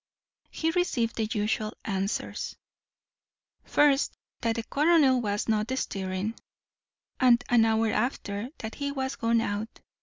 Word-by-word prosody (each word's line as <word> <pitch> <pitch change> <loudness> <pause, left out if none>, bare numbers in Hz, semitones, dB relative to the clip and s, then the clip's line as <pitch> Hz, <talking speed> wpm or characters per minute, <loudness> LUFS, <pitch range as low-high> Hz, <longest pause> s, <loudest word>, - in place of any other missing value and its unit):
He 325 0 -1
received 265 -10 0
the 220 - +1
usual 215 0 -1
answers; 195 0 -2 1.1
first, 290 -1 +3 0.2
that 230 -1 +1
the 230 - -2
colonel 285 -3 +4
was 205 -2 -1
not 215 0 +1
stirring, 190 -1 -2 0.9
and 245 -2 +5
an 235 -2 +5
hour 225 0 +2
after 215 -1 -2
that 220 0 -6
he 280 0 -3
was 265 -1 -2
gone 230 0 +2
out. 210 +1 -4
230 Hz, 125 wpm, -28 LUFS, 215-265 Hz, 1.1 s, and